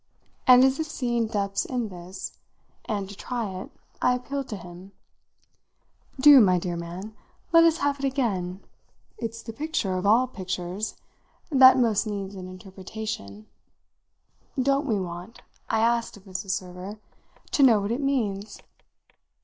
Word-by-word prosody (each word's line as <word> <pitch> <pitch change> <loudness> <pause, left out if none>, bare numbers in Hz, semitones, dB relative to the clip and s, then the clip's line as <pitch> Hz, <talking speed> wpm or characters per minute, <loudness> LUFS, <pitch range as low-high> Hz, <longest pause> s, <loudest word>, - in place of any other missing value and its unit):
And 250 0 +9
as 265 +2 +3
if 315 - -1
seeing 240 -6 -1
depths 200 -3 -1
in 245 -4 -3
this, 180 0 -8 0.5
and 200 -3 -2
to 200 - -10
try 235 -2 -4
it, - - -9 0.3
I 250 - +3
appealed 270 +2 -4
to 210 - -5
him. 180 +2 -12 1.3
"Do, 285 0 +9
my 185 -4 +4
dear 175 0 -3
man, 175 +5 -7 0.4
let 330 0 +7
us 330 -1 +4
have 285 -2 0
it 275 - -2
again. 200 -9 -1 0.6
It's 230 0 -5
the 225 - -7
picture, 285 -8 -2
of 185 +2 -1
all 230 +5 +5
pictures, 185 -2 -4 0.6
that 260 -2 +8
most 230 -3 +2
needs 200 -2 -4
an 185 -2 -8
interpreter. 185 - -7 1.2
Don't 275 +2 +2
we 215 -5 +1
want," 180 +4 -7 0.3
I 220 - +2
asked 235 -1 +1
of 195 - -17
Mrs. 195 +1 -6
Server, 185 +2 -4 0.5
"to 290 - +2
know 240 -6 +7
what 200 +2 -2
it 245 +5 -1
means?" 215 -7 -1
215 Hz, 150 wpm, -26 LUFS, 185-255 Hz, 1.3 s, And